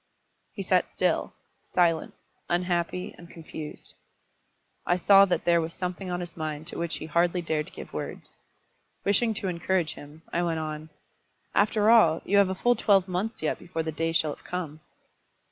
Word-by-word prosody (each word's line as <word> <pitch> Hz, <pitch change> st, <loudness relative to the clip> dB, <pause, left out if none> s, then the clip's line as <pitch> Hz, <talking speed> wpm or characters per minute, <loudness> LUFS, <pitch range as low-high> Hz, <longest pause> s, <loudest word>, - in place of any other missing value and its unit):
He -, -, -5 dB
sat -, -, +2 dB
still, -, -, 0 dB, 0.3 s
silent, 170 Hz, -3 st, +1 dB, 0.3 s
unhappy, 175 Hz, 0 st, -1 dB
and 170 Hz, -1 st, -12 dB
confused. 160 Hz, -2 st, -9 dB, 0.9 s
I 175 Hz, -, +2 dB
saw 195 Hz, +2 st, +7 dB
that 185 Hz, -, -1 dB
there 170 Hz, -1 st, +4 dB
was 165 Hz, +1 st, -5 dB
something 180 Hz, +1 st, -4 dB
on 180 Hz, 0 st, -2 dB
his 175 Hz, 0 st, -7 dB
mind 155 Hz, -2 st, -4 dB
to -, -, -6 dB
which 170 Hz, -1 st, -2 dB
he -, -, -6 dB
hardly 170 Hz, +2 st, +1 dB
dared 155 Hz, -2 st, -1 dB
to -, -, -13 dB
give -, -, -10 dB
words. -, -, -6 dB, 0.7 s
Wishing 220 Hz, +3 st, +2 dB
to 195 Hz, -, -3 dB
encourage 175 Hz, -2 st, 0 dB
him, 150 Hz, +3 st, -13 dB
I 175 Hz, -, +1 dB
went 170 Hz, -2 st, 0 dB
on. 155 Hz, 0 st, -5 dB, 0.6 s
"After 215 Hz, +1 st, +3 dB
all, 170 Hz, -9 st, +5 dB
you 200 Hz, -, +3 dB
have 200 Hz, -2 st, +4 dB
a 190 Hz, -, -2 dB
full 245 Hz, +6 st, +3 dB
twelve 195 Hz, -5 st, +3 dB
months 185 Hz, +2 st, -3 dB
yet 155 Hz, -, 0 dB
before 165 Hz, -2 st, -4 dB
the 160 Hz, -, -3 dB
day 165 Hz, +1 st, -1 dB
shall 155 Hz, -2 st, +1 dB
have -, -, -16 dB
come." 165 Hz, -4 st, -5 dB
175 Hz, 180 wpm, -27 LUFS, 160-185 Hz, 0.9 s, saw